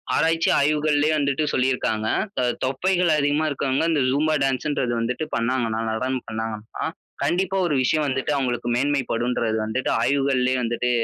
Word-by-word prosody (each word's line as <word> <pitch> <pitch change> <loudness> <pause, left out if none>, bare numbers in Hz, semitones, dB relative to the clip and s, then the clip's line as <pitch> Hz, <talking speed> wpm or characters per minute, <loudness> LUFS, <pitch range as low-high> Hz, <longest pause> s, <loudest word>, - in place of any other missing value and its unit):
ஆராய்ச்சி 165 0 +2
ஆய்வுகள்லயே 150 +1 +2
வந்துட்டு 140 +1 0
சொல்லிருக்காங்க. 125 -4 0 0.3
த - - +2 0.2
தொப்பைகள் 175 +6 +1
அதிகமா 145 +2 +1
இருக்கவங்க, 135 +1 0
இந்த 150 -3 +2
ஜும்பா 155 +3 +1
டான்ஸ்ன்றது 135 -2 0
வந்துட்டு 125 +6 -2
பண்ணாங்கனா, 115 -1 0
நடனம் 130 +3 -2
பண்ணாங்கனா, 110 -1 -5 0.4
கண்டிப்பா 190 +2 0
ஒரு 150 - 0
விஷயம் 155 +3 +1
வந்துட்டு, 130 +2 -1
அவங்களுக்கு 120 -2 -1
மேன்மை 140 +2 +1
படுன்றது 115 -1 0
வந்துட்டு, 110 +4 -2
ஆய்வுகள்லேயே 135 -2 +1
வந்துட்டு 120 +1 -1
130 Hz, 135 wpm, -23 LUFS, 120-150 Hz, 0.4 s, ஆராய்ச்சி